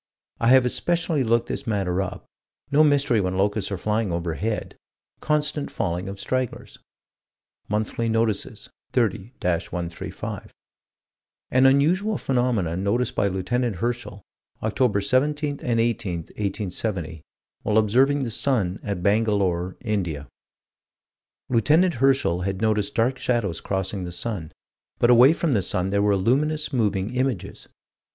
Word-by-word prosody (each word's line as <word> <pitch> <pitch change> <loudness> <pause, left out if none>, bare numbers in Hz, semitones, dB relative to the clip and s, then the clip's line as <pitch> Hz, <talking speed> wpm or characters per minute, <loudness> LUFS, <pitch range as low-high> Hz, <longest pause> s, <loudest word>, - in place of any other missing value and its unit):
I 115 - +1
have 130 0 +6
especially 165 +2 0
looked 115 0 +1
this 135 - -5
matter 95 -4 0
up 95 - -5 0.5
no 150 +2 +5
mystery 140 -6 +3
when 95 0 -1
locusts 100 +1 0
are 100 - -2
flying 105 +1 -1
overhead 85 +6 -3 0.4
constant 150 -1 0
falling 90 +3 -2
of 100 0 -7
stragglers. 130 +3 -3 0.9
Monthly 110 +2 -1
Notices, 115 -2 -1 0.2
30 115 -2 0
135: 85 -1 -4 1.0
"An 130 +1 +5
unusual 180 +10 +3
phenomenon 115 -9 0
noticed 115 +4 0
by 100 - +1
Lieut. 95 -1 -4 0.3
Herschel, 105 -1 -4 0.4
Oct. 110 -2 +1
17 145 +4 +1
and 115 -2 0
18, 115 -4 0
1870, 95 -2 -4 0.4
while 105 - +1
observing 130 +7 +3
the 120 - -3
sun, 105 -7 0
at 100 -4 -4
Bangalore, 100 -4 +1
India." 90 - -2 1.2
Lieut. 155 +9 +3
Herschel 135 - +2
had 95 +1 -2
noticed 105 -2 0
dark 125 +2 +1
shadows 110 -11 -1
crossing 95 -1 -3
the 90 - -6
sun 90 -4 -4 0.5
but 120 - +4
away 125 +4 +8
from 165 -3 0
the 105 - +2
sun 90 +1 -1
there 100 +1 +1
were 100 -1 +3
luminous, 150 +9 +1
moving 105 -2 0
images. 130 -6 -2
110 Hz, 130 wpm, -24 LUFS, 95-130 Hz, 1.2 s, away